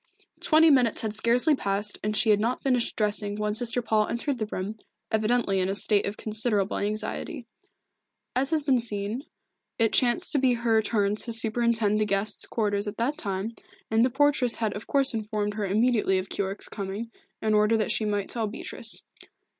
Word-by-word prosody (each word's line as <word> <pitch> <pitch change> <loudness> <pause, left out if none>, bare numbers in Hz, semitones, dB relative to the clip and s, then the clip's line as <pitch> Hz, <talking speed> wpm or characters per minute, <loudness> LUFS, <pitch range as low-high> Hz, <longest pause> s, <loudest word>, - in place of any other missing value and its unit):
Twenty 320 0 +5
minutes 245 -6 +3
had 215 -1 -2
scarcely 240 +7 +4
passed, 205 -4 -1
and 210 +1 +1
she 220 -1 +4
had 205 - +3
not 235 +4 -1
finished 250 -3 0
dressing 210 -1 0
when 210 0 -2
Sister 245 +2 0
Paul 215 -1 +1
entered 250 +2 -2
the 215 - -2
room, 210 +2 -5 0.3
evidently 220 -2 +1
in 185 0 0
a 195 - -1
state 205 0 +2
of 200 - -5
considerable 215 -2 -1
anxiety. 215 +3 -3 0.9
As 265 +2 +1
has 315 -2 0
been 270 -3 +2
seen, 220 +2 -3 0.5
it 225 -2 +2
chanced 240 -3 +2
to 290 - +3
be 260 -2 +3
her 230 -2 +2
turn 205 -1 0
to 235 - -2
superintend 225 -1 +2
the - - +2
guest's 200 +1 -1
quarters 205 -2 -1
at 205 - -5
that 250 +6 0
time, 200 +2 -3 0.4
and 220 +1 +4
the 255 - +3
portress 270 -2 +3
had 220 -3 -2
of 205 - -8
course 275 -2 +3
informed 210 -2 -2
her 210 -1 -3
immediately 215 -1 +2
of 185 +1 -4
Keyork's 195 0 -3
coming, 205 +3 -6 0.3
in 215 -1 0
order 210 +1 +3
that 215 - -1
she - - 0
might 205 -2 -1
tell 225 -3 -2
Beatrice. 215 - -3
220 Hz, 185 wpm, -26 LUFS, 205-240 Hz, 0.9 s, Twenty